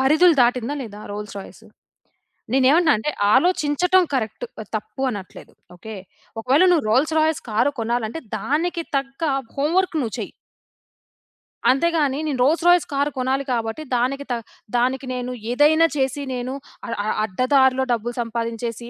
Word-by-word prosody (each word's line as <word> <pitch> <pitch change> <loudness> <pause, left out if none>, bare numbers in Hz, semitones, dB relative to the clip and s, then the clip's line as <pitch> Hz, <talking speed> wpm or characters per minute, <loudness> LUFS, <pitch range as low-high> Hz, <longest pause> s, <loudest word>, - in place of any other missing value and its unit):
పరిధులు 310 +6 +5
దాటిందా, 245 +3 +1
లేదా? 210 -3 -9
Roles 210 0 -6
Royce. 195 - -12 0.9
నేను 260 0 +3
ఏమంటున్నానంటే, 300 -5 +3 0.2
ఆలోచించటం 360 +1 +3
కరెక్ట్ 225 -1 -2 0.3
తప్పు 215 +5 -7
అనట్లేదు. 200 -4 -9 0.2
ఓకే, 220 +5 -9 0.5
ఒకవేళ 270 +9 +3
నువ్వు 315 -9 +2
రోల్స్ 295 +6 +2
రాయ్స్ 315 0 +1
కారు 230 +7 +2
కొనాలంటే, 235 +5 -2 0.2
దానికి 335 +4 -1
తగ్గ 275 +3 -4 0.3
హోమ్ 295 +5 0
వర్క్ 370 -3 0
నువ్వు 220 -5 -4
చెయ్యి. - - -6 1.4
అంతేగాని 295 -1 +1
నేను 275 -4 -2
రోల్స్ 325 +5 +2
రాయ్స్ 350 -1 +5
కారు 285 +1 0
కొనాలి 260 +2 0
కాబట్టి, 230 +5 -3
దానికి 275 +4 -1
త - - +2 0.4
దానికి 255 +2 0
నేను 250 0 -4 0.2
ఏదైనా 310 +5 +5
చేసి, 265 +1 0
నేను 250 +1 -4 0.3
అ - - -7 0.2
అ - - -3 0.2
అడ్డదారిలో 260 +5 +2
డబ్బులు 235 +1 -3
సంపాదించేసి, 230 0 -4
265 Hz, 135 wpm, -22 LUFS, 235-305 Hz, 1.4 s, పరిధులు